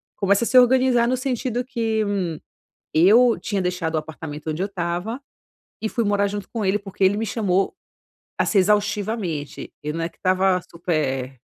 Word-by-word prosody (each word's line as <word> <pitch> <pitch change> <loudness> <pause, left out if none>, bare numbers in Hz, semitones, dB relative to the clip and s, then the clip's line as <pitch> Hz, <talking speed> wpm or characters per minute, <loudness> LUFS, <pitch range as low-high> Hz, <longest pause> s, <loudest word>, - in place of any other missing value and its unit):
Começa 200 +2 +2
a - - 0
se 255 - +4
organizar 250 -1 +4
no 255 +1 +1
sentido 250 -1 -2
que, 225 -3 -1
hum, 200 -2 -1 0.7
eu 220 +8 +5
tinha 200 -3 -2
deixado 180 -2 -2
o 155 - +3
apartamento 155 0 -6
onde 155 +4 -3
eu - - +1
estava 185 +5 -3 0.6
e 220 - -1
fui 235 - -1
morar 205 -1 +2
junto 205 0 -5
com 220 -4 -3
ele 195 +2 +2
porque 195 -1 -5
ele 195 +2 +4
me 225 - -1
chamou, 195 - 0 0.6
assim, 210 - +1
exaustivamente, 205 -5 -1
eu 150 0 -3
não 165 - -3
é 165 - -2
que - - -30
estava 185 0 +2
super 135 -6 -2
200 Hz, 175 wpm, -22 LUFS, 175-225 Hz, 0.7 s, eu